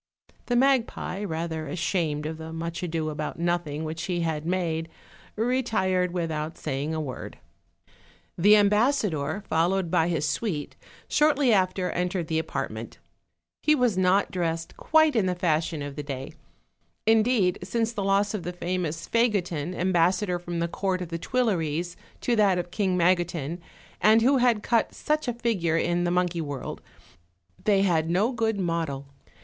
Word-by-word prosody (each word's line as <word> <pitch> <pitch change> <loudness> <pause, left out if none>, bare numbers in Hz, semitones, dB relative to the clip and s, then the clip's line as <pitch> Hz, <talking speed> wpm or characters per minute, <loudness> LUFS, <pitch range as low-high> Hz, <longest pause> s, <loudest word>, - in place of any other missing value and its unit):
The 245 - +1
magpie, 245 -6 +1
rather 160 -3 -3
ashamed 160 -2 -1
of 160 +1 -4
the 160 0 -7
much 165 +1 -4
ado 160 -3 -2
about 150 0 -4
nothing 170 -3 -1
which 160 +2 -4
he 175 -2 -1
had 160 -1 -2
made, 165 -3 -1 0.5
retired 215 -7 +1
without 160 -3 -3
saying 150 +2 -3
a - - -2
word. 135 -5 -6 1.0
The 205 +5 +6
ambassador, 205 - +2
followed 175 +2 +1
by 160 - +3
his 155 -4 0
suite, 170 -11 -2 0.3
shortly 290 -5 +3
after 185 -1 +1
entered 180 -1 -2
the 160 -1 +1
apartment. 160 - -5 0.6
He 305 - +4
was 250 -7 +2
not 185 +2 +2
dressed 165 -2 -2
quite 315 -3 +3
in 210 -5 +2
the 180 - 0
fashion 160 -3 0
of 145 -1 -6
the 150 - -4
day: 135 -2 -6 0.7
indeed, 220 -4 +3
since 230 0 -1
the 205 -3 -3
loss 200 +1 +2
of 210 - -2
the 175 +2 -5
famous 175 -2 -3
Fagotin, 185 -8 0
ambassador 180 +1 +1
from 175 0 -5
the 170 0 0
court 185 +1 -2
of 170 - -8
the 165 0 -4
Tuileries 175 -8 -1 0.3
to 240 - +1
that 200 -4 +4
of 175 0 -4
King 190 -3 0
Magotin, 175 -2 +1 0.4
and 220 +1 +5
who 270 +3 +4
had 240 -4 +2
cut 230 -2 +1
such 305 -2 -1
a 245 - 0
figure 200 -9 0
in 175 +1 +1
the - - +1
monkey 175 -1 0
world, 145 -3 -5 0.8
they 200 -2 +4
had 165 -5 +2
had - - -5
no 195 +8 +2
good 225 -4 0
model. 165 -6 -2
180 Hz, 160 wpm, -26 LUFS, 160-210 Hz, 1.0 s, The